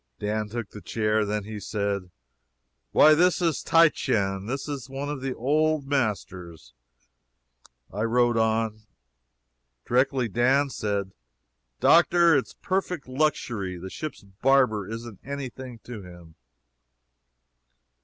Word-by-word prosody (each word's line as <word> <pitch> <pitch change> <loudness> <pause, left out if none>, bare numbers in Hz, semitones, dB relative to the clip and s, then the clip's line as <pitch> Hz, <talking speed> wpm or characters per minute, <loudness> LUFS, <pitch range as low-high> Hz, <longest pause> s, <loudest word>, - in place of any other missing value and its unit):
Dan 105 +1 -2
took 115 -1 -5
the 105 - -10
chair. 110 0 0
Then 105 0 -2
he 105 +1 -7
said: 100 -3 -3 0.8
"Why 155 - +7
this 180 +3 +3
is 165 -4 0
Titian. 105 -12 +2
This 135 +4 -3
is 135 -3 -5
one 135 +2 -4
of 145 -3 -4
the 135 -1 -3
old 155 +3 +1
masters." 90 - -3 1.2
I 105 - -3
wrote 120 +1 +2
on. 110 -1 0 1.0
Directly 130 0 +1
Dan 130 +6 +2
said: 100 -4 -2 0.7
"Doctor, 170 -1 +5
it 130 -6 +1
is - - -16
perfect 180 - -2
luxury. 120 -9 -1
The 95 +2 -8
ship's 155 -7 -6
barber 110 0 +1
isn't 115 -2 -7
any 140 -1 -5
thing 125 0 -10
to 120 -4 -8
him." 85 -3 -13
120 Hz, 125 wpm, -26 LUFS, 105-140 Hz, 1.2 s, Why